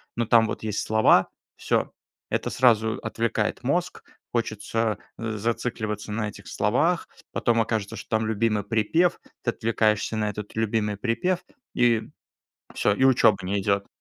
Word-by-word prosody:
но 120 - 0
там 115 0 +5
вот - - -5
есть 105 -2 -2
слова- 110 -3 +4 0.3
всё. - - 0 0.4
Это - - -1
сразу 110 -3 +3
отвлекает 115 -1 -1
мозг, - - -1 0.3
хочется, 115 -2 -1 0.2
э, 110 -2 -3
зацикливаться 110 -1 -3
на 110 -1 -1
этих - - -13
словах, - - +1 0.3
потом 115 -1 +2
окажется, 110 0 -2
что - - -10
там 110 - -2
любимый 110 -1 +1
припев, 115 - +1 0.2
ты 120 - +1
отвлекаешься 110 -1 0
на 105 -1 0
этот 105 +1 -7
любимый 110 -1 0
припев- 130 - 0 0.4
и 120 -2 +3 0.7
всё, 105 - +2
и 130 - +1
учёба 130 -6 +5
не 100 +2 -1
идёт. 100 -1 0
110 Hz, 145 wpm, -25 LUFS, 105-115 Hz, 0.7 s, там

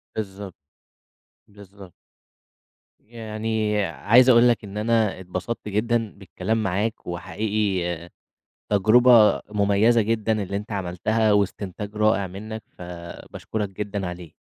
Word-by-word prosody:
بالضبط، 100 -3 -6 0.9
بالضبط. 100 -3 -15 1.1
يعني 110 -1 -3
عايز 105 - +4
أقول 120 0 +6
لك 120 - 0
إن 100 0 -8
أنا 110 -3 +1
اتبسطت 95 +5 -5
جدًا 110 +1 0
بالكلام 100 +3 -3
معاك 100 +3 -2
وحقيقي 90 -2 -2 0.6
تجرُبة 110 +2 +5
مميّزة 105 +3 +3
جدًا 110 -1 0
اللي 100 +1 -3
أنت 105 +2 -8
عملتها 105 +4 0
واستنتاج 100 +1 -2
رائع 105 -2 +2
منك 110 +4 -8
فباشكرك 90 +4 -6
جدًا 100 -1 -4
عليه. 90 -2 -9
105 Hz, 105 wpm, -23 LUFS, 95-110 Hz, 1.1 s, أقول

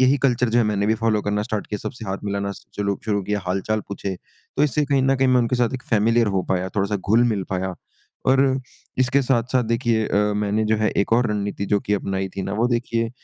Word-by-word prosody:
यही 130 +2 +4
कल्चर 125 -2 +2
जो 115 - +2
है 120 - +4
मैंने 105 -1 0
भी 110 - +3
फ़ॉलो 110 -1 +1
करना 105 0 0
स्टार्ट 105 -1 -3
किया 105 - -4
सबसे 120 -4 -10
हाथ 95 +1 -2
मिलाना 100 0 -2 0.2
जो 105 - -2
लोग 100 -1 -1
जो 110 - -1
लोग 100 -1 -1
हैं 105 - +2
हाल-चाल 95 +4 -1
पूछे 100 -1 -4 0.4
तो - - +3
इससे 150 +1 +1
कहीं 140 -1 +2
न 135 +1 +3
कहीं 130 0 +2
मैं 125 - +5
उनके 120 +1 0
साथ 120 +1 +1
एक 130 - -5
फैमिलियर 115 +1 +3
हो 95 -2 0
पाया, 95 0 -1
थोड़ा-सा 100 +2 -1
घुल-मिल 110 0 +2
पाया 95 0 -2 0.5
और 130 +1 +5 0.6
इसके 130 +2 +3
साथ-साथ 125 0 +1
देखिए 115 -1 +1
अ, 105 0 +2
मैंने 105 +1 0
जो 110 0 +2
है 110 0 +1
एक 100 - 0
और 120 +1 +4
रणनीति 100 -1 -2
जो 100 - +5
कि 105 - -2
अपनाई 95 -1 -2
थी 95 - -2
ना 95 - -4
वो 115 +3 +2
देखिए 115 -1 -1
110 Hz, 240 wpm, -22 LUFS, 100-120 Hz, 0.6 s, मैं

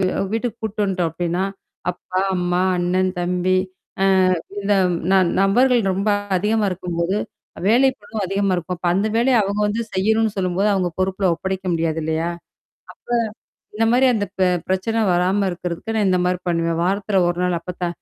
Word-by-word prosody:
வீ 190 - +2 0.3
வீட்டுக்கு 230 0 -2
கூட்டு 210 -1 -2
வந்துட்டோம் 185 -4 0
அப்டின்னா, 175 +2 -1 0.5
அப்பா, 185 +1 -4 0.2
அம்மா, 180 0 0 0.2
அண்ணன், 185 +1 +1
தம்பி, 180 +1 +1 0.8
அ - - -2 0.2
இந்த 200 +1 0 0.4
ந - - +5 0.3
நபர்கள் 240 +5 +4
ரொம்ப 195 +3 -1 0.3
அதிகமா 210 +2 +1
இருக்கும்போது, 175 +1 -2 0.5
வேலை 250 +5 +5
பளு 205 +2 -11
அதிகமா 195 +1 0
இருக்கும். 180 +1 -4
அப்ப 180 - -4
அந்த 200 +3 +1
வேலைய 245 +2 +3
அவங்க 200 +1 -2
வந்து 220 +3 -1
செய்யணும்ன்னு 220 +2 +1
சொல்லும்போது, 185 +2 +1
அவங்க 185 -2 +1
பொறுப்புல 190 0 +1
ஒப்படைக்க 190 +2 -4
முடியாது 165 -1 -1
இல்லையா? 160 +2 -1 1.4
அப்ப - - -30
இந்த 225 - +3
மாரி 255 +2 +4
அந்த 210 -2 0
பி 185 - +4 0.2
பிரச்சனை 190 +5 0
வராம 185 +3 +2
இருக்கிறதுக்கு, 180 +5 -5
நான் 210 -3 +2
இந்த 185 - +2
மாரி 180 0 0
பண்ணுவேன். 165 -1 0
வாரத்தில 195 +1 +1
ஒரு 175 0 -2
நாள், 180 -1 0
"அப்பத்தா, 180 0 -4
190 Hz, 160 wpm, -21 LUFS, 180-210 Hz, 1.4 s, ந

